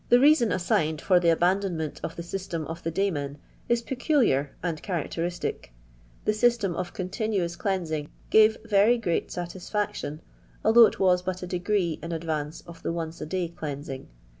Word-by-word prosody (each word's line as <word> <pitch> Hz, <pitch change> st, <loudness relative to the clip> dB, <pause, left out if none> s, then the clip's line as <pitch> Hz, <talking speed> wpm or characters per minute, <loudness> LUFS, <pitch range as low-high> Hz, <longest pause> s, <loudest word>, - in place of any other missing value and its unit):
reason 245 Hz, -1 st, +6 dB
assigned 160 Hz, -3 st, +1 dB
for 180 Hz, +2 st, +4 dB
the 170 Hz, -1 st, +3 dB
abandonment 175 Hz, -2 st, +1 dB
of 165 Hz, -, -5 dB
the 170 Hz, -, -5 dB
sys 190 Hz, +2 st, -5 dB
tem 165 Hz, -2 st, -2 dB
of 165 Hz, +2 st, -6 dB
the 165 Hz, -, -2 dB
daymen 155 Hz, -7 st, -1 dB, 0.3 s
is 235 Hz, 0 st, +2 dB
peculiar 245 Hz, -, +2 dB
and 165 Hz, -4 st, -2 dB
characteristic 175 Hz, -, -3 dB, 0.5 s
The 215 Hz, -, +3 dB
system 215 Hz, -5 st, +2 dB
of 180 Hz, 0 st, -3 dB
continuous 185 Hz, -2 st, -2 dB
cleansing 165 Hz, -7 st, -2 dB, 0.2 s
gave 220 Hz, 0 st, +6 dB
Tery 220 Hz, +2 st, +4 dB
great 175 Hz, -7 st, -1 dB
satisfoction, 175 Hz, -3 st, -4 dB, 0.4 s
although 225 Hz, +1 st, +8 dB
it -, -, -6 dB
was 180 Hz, -2 st, +4 dB
but 185 Hz, 0 st, -4 dB
a -, -, -2 dB
degree 180 Hz, -1 st, 0 dB
in 170 Hz, -, -5 dB
advance 160 Hz, -2 st, -3 dB
of 170 Hz, -1 st, -12 dB
the -, -, -2 dB
onee 165 Hz, -1 st, -2 dB
arday 170 Hz, +1 st, -3 dB
deansinff. 145 Hz, -3 st, -6 dB
175 Hz, 160 wpm, -27 LUFS, 165-205 Hz, 0.5 s, although